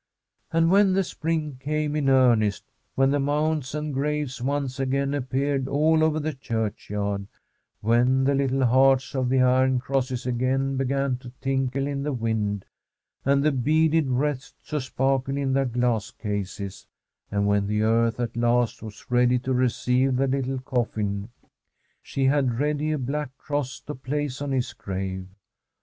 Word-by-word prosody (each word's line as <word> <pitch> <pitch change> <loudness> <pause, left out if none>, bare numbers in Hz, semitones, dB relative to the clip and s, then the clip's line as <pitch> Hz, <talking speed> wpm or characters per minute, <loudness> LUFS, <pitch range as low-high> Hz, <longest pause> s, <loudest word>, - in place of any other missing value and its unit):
And 165 +1 +3
when 195 -1 +5
the 195 +1 +2
spring 155 -5 -3
came 150 +1 -1
in 145 -3 +1
earnest, 120 -6 +3 0.3
when 135 0 +3
mounds 150 -1 0
and 150 -1 -3
graves 145 -2 -2
once 135 0 -2
again 135 +1 0
appeared 135 0 -1
all 155 +3 +3
over 155 0 +2
the 155 +1 -2
churchyard, 105 -5 -3 0.5
when 125 +4 +3
the 140 +1 +3
little 135 -1 +1
hearts 130 +2 +4
of 130 -2 0
the 130 0 +3
iron 130 +1 +4
crosses 130 0 -2
again 130 +2 0
began 135 0 0
to 125 -1 -11
tinkle 135 0 -1
in 140 -1 -2
the 145 +1 -2
wind, 110 -4 -1 0.6
and 140 +1 +3
the 155 - +3
beaded 155 +3 +2
wreaths 135 +1 -1
to 150 -2 -1
sparkle 135 +1 0
in 135 -2 0
their 135 0 +2
glass 120 -2 0
cases, 100 -3 -5 0.4
and 100 0 0
when 100 -1 +2
the 105 +1 0
earth 115 +1 +2
at 120 -1 -2
last 120 0 +1
was 105 -1 -10
ready 125 0 +4
to 130 +1 -2
receive 125 +1 +1
the 135 +2 +2
little 135 0 -1
coffin, 110 -5 -2 0.7
she 135 - -2
had 135 -4 +2
ready 150 +1 0
a 155 - 0
black 140 +1 -3
cross 135 -4 -3
to 150 - -6
place 140 +1 -3
on 145 -1 -2
his 130 -2 -1
grave. 95 -1 -5
130 Hz, 155 wpm, -25 LUFS, 120-140 Hz, 0.7 s, when